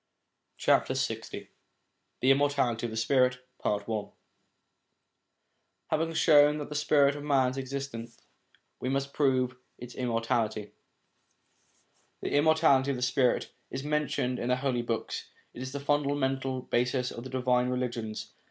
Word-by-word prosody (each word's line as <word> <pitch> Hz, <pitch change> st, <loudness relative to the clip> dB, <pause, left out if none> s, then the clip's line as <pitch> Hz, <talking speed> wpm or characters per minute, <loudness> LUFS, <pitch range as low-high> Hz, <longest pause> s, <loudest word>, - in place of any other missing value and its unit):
LX -, -, +1 dB, 0.9 s
THE 130 Hz, -, +5 dB
IMMORTALITY 135 Hz, -4 st, +2 dB
OF -, -, -6 dB
THE 110 Hz, -, -6 dB
SPIRIT 125 Hz, +2 st, +3 dB, 0.3 s
(I) 105 Hz, -1 st, 0 dB, 2.1 s
HAVING 165 Hz, +1 st, 0 dB
shown 150 Hz, -2 st, +6 dB
that 150 Hz, -, -5 dB
the -, -, -5 dB
spirit 145 Hz, -1 st, +3 dB
of 145 Hz, -, -7 dB
man 135 Hz, -3 st, +2 dB
exists, 135 Hz, +1 st, -4 dB
1 115 Hz, 0 st, -6 dB, 0.7 s
we 130 Hz, -, -2 dB
must 140 Hz, +1 st, -1 dB
prove 130 Hz, -3 st, +1 dB, 0.2 s
its 125 Hz, 0 st, -9 dB
immortality. 115 Hz, -3 st, -1 dB, 1.5 s
The -, -, -2 dB
immortality 145 Hz, -3 st, +4 dB
of 135 Hz, -, 0 dB
the 125 Hz, -, -3 dB
spirit 130 Hz, 0 st, +1 dB, 0.2 s
is 130 Hz, -, -5 dB
mentioned 145 Hz, -4 st, -1 dB
in 120 Hz, -, -2 dB
the 125 Hz, -, +4 dB
Holy 130 Hz, -2 st, -1 dB
Books; 115 Hz, -1 st, -4 dB, 0.2 s
it -, -, -8 dB
is 130 Hz, 0 st, -5 dB
the 140 Hz, -, -4 dB
fundamental 140 Hz, -2 st, 0 dB
basis 125 Hz, +1 st, 0 dB
of 115 Hz, -, -7 dB
the 130 Hz, -, -7 dB
divine 125 Hz, -1 st, +1 dB
religions. 120 Hz, -4 st, -3 dB
130 Hz, 135 wpm, -29 LUFS, 125-140 Hz, 2.1 s, shown